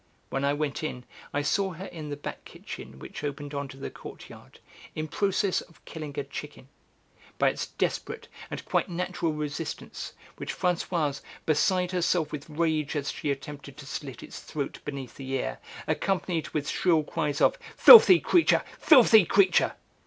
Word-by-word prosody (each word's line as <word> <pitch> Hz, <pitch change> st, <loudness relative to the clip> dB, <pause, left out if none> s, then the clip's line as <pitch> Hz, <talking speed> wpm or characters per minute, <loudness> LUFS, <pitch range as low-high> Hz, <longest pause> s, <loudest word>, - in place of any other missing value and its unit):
When 135 Hz, -, -1 dB
I 140 Hz, 0 st, +2 dB
went 150 Hz, +1 st, -2 dB
in, 125 Hz, -5 st, -4 dB, 0.3 s
I 145 Hz, -, -1 dB
saw 195 Hz, +4 st, 0 dB
her 180 Hz, +4 st, -8 dB
in 160 Hz, -5 st, -8 dB
the 145 Hz, -, -4 dB
back 145 Hz, -, -7 dB
kitchen 65 Hz, -, -10 dB
which 65 Hz, -, -9 dB
opened 145 Hz, 0 st, -5 dB
on 140 Hz, 0 st, -3 dB
to 135 Hz, -, -12 dB
the 135 Hz, -, -6 dB
courtyard, -, -, -12 dB, 0.4 s
in 155 Hz, 0 st, -3 dB
process 195 Hz, +3 st, 0 dB
of 170 Hz, -, -19 dB
killing 150 Hz, -3 st, -7 dB
a 145 Hz, -, -1 dB
chicken; 140 Hz, -1 st, -9 dB, 0.7 s
by -, -, +4 dB
its -, -, -4 dB
desperate -, -, -3 dB, 0.2 s
and -, -, -6 dB
quite -, -, 0 dB
natural 175 Hz, -1 st, -2 dB
resistance, 150 Hz, +1 st, -5 dB, 0.2 s
which -, -, -5 dB
Françoise, 170 Hz, -5 st, 0 dB, 0.2 s
beside 180 Hz, +4 st, +2 dB
herself 175 Hz, -3 st, +1 dB
with 150 Hz, 0 st, -7 dB
rage 155 Hz, -1 st, 0 dB
as 145 Hz, -1 st, -1 dB
she 150 Hz, -, -4 dB
attempted 140 Hz, 0 st, -6 dB
to 150 Hz, -, -10 dB
slit 135 Hz, -2 st, -7 dB
its -, -, -9 dB
throat 145 Hz, -3 st, -5 dB
beneath 135 Hz, -4 st, -6 dB
the 135 Hz, -1 st, -7 dB
ear, -, -, -2 dB, 0.3 s
accompanied 180 Hz, -4 st, -1 dB
with 150 Hz, -2 st, -3 dB
shrill 165 Hz, -4 st, +2 dB
cries 145 Hz, -1 st, -2 dB
of -, -, +3 dB, 0.2 s
"Filthy 380 Hz, -6 st, +10 dB
creature! 345 Hz, -, +3 dB, 0.2 s
Filthy 235 Hz, -, +7 dB
creature!" 190 Hz, +1 st, +3 dB
150 Hz, 165 wpm, -27 LUFS, 145-180 Hz, 0.7 s, Filthy